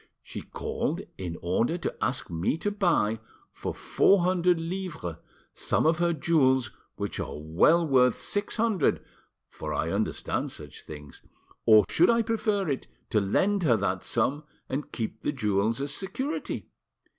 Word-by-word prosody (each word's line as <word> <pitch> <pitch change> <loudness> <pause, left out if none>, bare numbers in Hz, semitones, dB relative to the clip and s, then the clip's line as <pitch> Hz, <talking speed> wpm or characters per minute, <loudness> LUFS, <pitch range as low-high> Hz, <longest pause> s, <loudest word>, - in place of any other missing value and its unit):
"She - - -7
called - - -3 0.2
in 85 -3 -4
order 115 - +1
to 175 - -3
ask 120 +3 -1
me 85 - 0
to 205 +5 -1
buy, 170 - +1 0.3
for - - -4
four 195 -2 +3
hundred 180 -1 +3
livres, 165 - -4 0.4
some - - 0
of 160 +1 +3
her 170 0 +3
jewels 135 -6 +2 0.2
which - - -4
are - - -4
well 85 - +3
worth 125 -3 +4
six 205 0 -1
hundred, 220 -7 +1 0.4
for 75 -1 -5
I 80 +3 -1
understand 105 +2 -1
such - - -10
things; 75 -2 -11 0.5
or 110 -2 +8
should 175 - +4
I 230 0 +4
prefer 215 -4 0
it 140 -3 -2 0.2
to 110 - +4
lend 195 - +2
her 125 -9 +4
that 95 -2 -1
sum 130 +6 0 0.2
and 140 +3 -4
keep 110 -2 -4
the - - 0
jewels 110 -3 0
as 140 +1 -3
security? 260 - -4
140 Hz, 155 wpm, -27 LUFS, -, 0.5 s, or